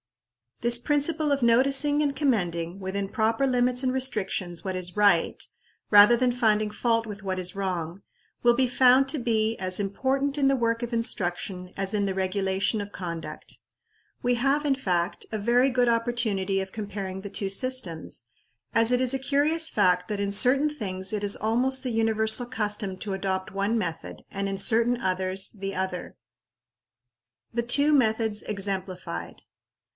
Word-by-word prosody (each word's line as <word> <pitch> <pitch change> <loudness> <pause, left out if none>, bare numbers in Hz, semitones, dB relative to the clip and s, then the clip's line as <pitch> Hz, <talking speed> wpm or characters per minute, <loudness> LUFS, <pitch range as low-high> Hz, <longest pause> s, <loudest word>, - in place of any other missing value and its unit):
This 235 0 +2
principle 295 +3 +1
of 280 -1 +1
noticing 275 +5 +3
and 285 -2 0
commending, 180 - -1
within 195 +1 -3
proper 225 +5 0
limits 250 0 +1
and 255 - +1
restrictions, 190 -9 -2
what 190 -1 -3
is 180 +1 -5
right, 200 -5 +3 0.5
rather 210 +3 +8
than 250 0 +2
finding 215 -3 +1
fault 230 +1 0
with 210 -1 -8
what 190 -1 -3
is 180 0 -1
wrong, 185 -2 -4 0.4
will 240 0 +5
be 260 +1 +2
found 255 +2 +4
to 295 - -1
be 225 -2 0
as 185 0 -1
important 270 +8 -1
in 275 -2 +2
the 275 - +3
work 230 -1 0
of 240 - -4
instruction 185 -5 -2
as 195 +1 -2
in 205 -1 +1
the 195 - -1
regulation 190 +2 0
of 205 0 -8
conduct. 170 -4 -7 0.6
We 245 0 +2
have, 275 +5 +1
in 285 - +3
fact, 180 -7 -2
a 220 - -2
very 240 +5 +3
good 250 -1 +1
opportunity 225 -5 0
of 190 0 -7
comparing 200 -3 -6
the 200 - -7
two 200 0 -2
systems, 195 - +1 0.5
as 230 +1 +3
it 250 0 +2
is 255 0 +3
a - - -2
curious 295 +5 +1
fact 180 -3 +2
that 210 -1 -3
in 200 0 -1
certain 265 +8 +3
things 195 -8 -3
it 210 -1 -2
is 200 0 +1
almost 250 +5 0
the 255 - -2
universal 220 +1 +1
custom 210 -4 -3
to 200 0 -5
adopt 190 -1 -3
one 200 +4 -1
method, 170 -5 -5
and 200 0 -3
in 195 - -3
certain 235 +4 +2
others, 185 -1 0
the 195 -2 -6
other. 185 -1 -4 1.4
The 235 0 -1
two 285 +5 +3
Methods 220 -5 +1
exemplified. 185 - -4
215 Hz, 165 wpm, -26 LUFS, 190-250 Hz, 1.4 s, rather